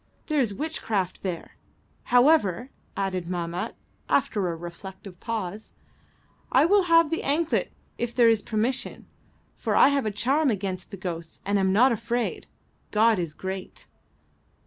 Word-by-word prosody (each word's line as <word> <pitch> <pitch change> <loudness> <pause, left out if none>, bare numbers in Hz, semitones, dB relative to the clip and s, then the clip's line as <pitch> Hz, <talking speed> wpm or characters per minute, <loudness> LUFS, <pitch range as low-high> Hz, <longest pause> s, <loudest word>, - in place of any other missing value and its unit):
There 305 -2 0
is 240 -6 +2
witchcraft 215 - -2
there. 180 -4 -5 0.5
However," 250 - +3 0.3
added 185 -3 -2
Mahmat, 175 0 -3 0.3
after 195 -4 +1
a - - -4
reflective 180 +2 -10
pause, 215 -2 -5 0.8
"I - - +5
will 395 +2 +4
have 330 -2 +5
the 330 - 0
anklet 310 +4 0 0.3
if 240 -1 -1
there 235 -1 +4
is 225 -2 +4
permission, 225 +5 -2 0.5
for - - -1
I - - +7
have 280 -5 0
a - - +2
charm 265 +9 +1
against 190 -4 -3
the 200 - -8
ghosts 170 -3 -6
and 200 0 +1
am 190 -1 +2
not 245 +7 +5
afraid. 235 +2 -2 0.4
God 220 -1 +3
is 165 -4 -3
great!" 190 0 -6
215 Hz, 145 wpm, -26 LUFS, 185-260 Hz, 0.8 s, I